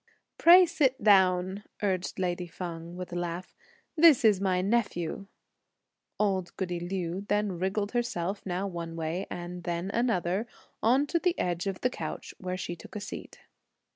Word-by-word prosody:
"Pray 360 Hz, +2 st, +9 dB
sit 285 Hz, -8 st, +1 dB
down," 190 Hz, -1 st, +4 dB, 0.2 s
urged 185 Hz, -3 st, -1 dB
lady 180 Hz, -1 st, -1 dB
Feng, 170 Hz, 0 st, -7 dB
with 180 Hz, -1 st, -6 dB
a -, -, -3 dB
laugh; 175 Hz, +1 st, -4 dB, 0.4 s
"this 310 Hz, -7 st, +6 dB
is 205 Hz, -3 st, +5 dB
my 185 Hz, -2 st, +2 dB
nephew!' 195 Hz, -3 st, -1 dB, 0.9 s
Old 190 Hz, -4 st, 0 dB
goody 175 Hz, -2 st, -2 dB
Liu 175 Hz, 0 st, -3 dB
then 205 Hz, -4 st, 0 dB
wriggled 200 Hz, +3 st, -1 dB
herself, 200 Hz, -5 st, -2 dB
now 185 Hz, +1 st, -2 dB
one 170 Hz, -3 st, -5 dB
way, 165 Hz, +4 st, -3 dB
and 175 Hz, 0 st, -6 dB
then 175 Hz, +3 st, -2 dB
another, 215 Hz, -3 st, 0 dB, 0.3 s
on 255 Hz, +6 st, +4 dB
to 335 Hz, +4 st, 0 dB
the 360 Hz, 0 st, +1 dB
edge 175 Hz, +1 st, -1 dB
of 195 Hz, -1 st, -3 dB
the 250 Hz, -, +2 dB
couch, -, -, -6 dB
where 185 Hz, 0 st, -3 dB
she 175 Hz, -1 st, -4 dB
took 175 Hz, -, -13 dB
a -, -, -2 dB
seat. 205 Hz, -, -8 dB
185 Hz, 160 wpm, -29 LUFS, 175-210 Hz, 0.9 s, Pray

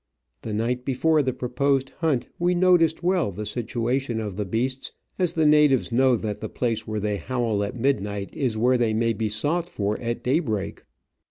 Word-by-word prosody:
The 110 Hz, -, -5 dB
night 120 Hz, +4 st, -1 dB
before 150 Hz, +4 st, +2 dB
the 130 Hz, -2 st, 0 dB
proposed 130 Hz, +2 st, 0 dB
hunt 150 Hz, -7 st, +1 dB
we 175 Hz, +1 st, +2 dB
noticed 175 Hz, -2 st, +3 dB
well 175 Hz, -, +1 dB
the 105 Hz, +3 st, -6 dB
situation 120 Hz, +2 st, -2 dB
of 105 Hz, -4 st, -4 dB
the 105 Hz, +1 st, -2 dB
beasts, 125 Hz, +6 st, -2 dB, 0.3 s
as 180 Hz, -2 st, +1 dB
the 160 Hz, -2 st, +2 dB
natives 150 Hz, -4 st, +4 dB
know 130 Hz, +1 st, +4 dB
that 105 Hz, -2 st, -4 dB
the 110 Hz, -, -4 dB
place 115 Hz, -3 st, -2 dB
where 110 Hz, 0 st, -2 dB
they 105 Hz, 0 st, -1 dB
howl 115 Hz, 0 st, -1 dB
at 100 Hz, -, -4 dB
midnight 105 Hz, -6 st, -1 dB
is 125 Hz, -6 st, -1 dB
where 125 Hz, +3 st, +3 dB
they 110 Hz, -2 st, +1 dB
may 115 Hz, +1 st, +1 dB
be 110 Hz, 0 st, -2 dB
sought 155 Hz, +11 st, -1 dB
for 105 Hz, -, -2 dB
at 120 Hz, 0 st, -3 dB
daybreak. 125 Hz, -, -1 dB
120 Hz, 185 wpm, -24 LUFS, 110-140 Hz, 0.3 s, natives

